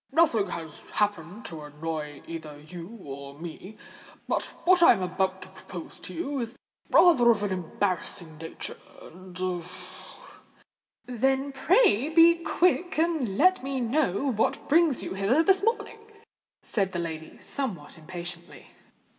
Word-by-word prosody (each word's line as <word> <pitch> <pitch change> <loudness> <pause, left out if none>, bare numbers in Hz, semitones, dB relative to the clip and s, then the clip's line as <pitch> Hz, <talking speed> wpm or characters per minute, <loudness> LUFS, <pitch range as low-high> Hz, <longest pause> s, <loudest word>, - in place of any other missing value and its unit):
"Nothing 270 -10 +3
has 160 -4 -7
happened 205 +1 -1
to 160 -3 -7
annoy 150 0 -6
either 155 -3 -8
you 175 +8 -10
or 140 0 -8
me; 175 +6 -9 0.5
but - - 0 0.2
what 360 0 +5
I 335 - +9
am 190 -5 -3
about 185 +1 -1
to 185 - -12
propose 185 -2 -10
to - - -7
you, 275 - -2
is 235 0 -4 0.3
rather 300 -10 +6
of 215 -3 +3
an 205 - -1
embarrassing 180 -3 -3
nature—and——" 180 +2 -7 1.4
"Then 265 +3 0
pray 295 - +3
be 330 +1 +7
quick 355 0 +1
and 310 - 0
let 370 +4 +5
me 270 0 -2
know 260 0 +1
what 220 -2 0
brings 320 -2 +3
you - - -4
hither 200 +11 +2
this 385 +1 +4
morning," 450 +1 -1 0.6
said 195 -4 -1
the - - -2
lady, 160 -2 -5
somewhat 200 - -4
impatiently. 170 +1 -8
200 Hz, 135 wpm, -27 LUFS, 170-275 Hz, 1.4 s, I